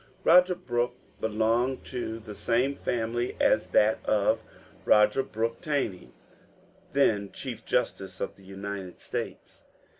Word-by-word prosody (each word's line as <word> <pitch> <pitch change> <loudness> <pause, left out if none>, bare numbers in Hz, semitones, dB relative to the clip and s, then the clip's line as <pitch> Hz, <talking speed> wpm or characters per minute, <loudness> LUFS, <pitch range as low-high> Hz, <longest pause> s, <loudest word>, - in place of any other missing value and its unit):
Roger 180 +2 +6
Brooke 120 -8 -1 0.2
belonged 115 +4 +1
to 120 -3 -4
the 110 -2 -9
same 125 +6 +1
family 120 -1 -2
as - - +3
that 110 +1 +3
of 110 +1 +2 0.4
Roger 105 +5 +5
Brooke 115 -3 -3
Taney, 140 - -2 0.8
then 105 -8 +2
chief - - -6
justice 95 -1 -1
of - - -3
the 100 - -19
United 95 -1 -7
States. - - -6
115 Hz, 120 wpm, -28 LUFS, 105-125 Hz, 0.8 s, Roger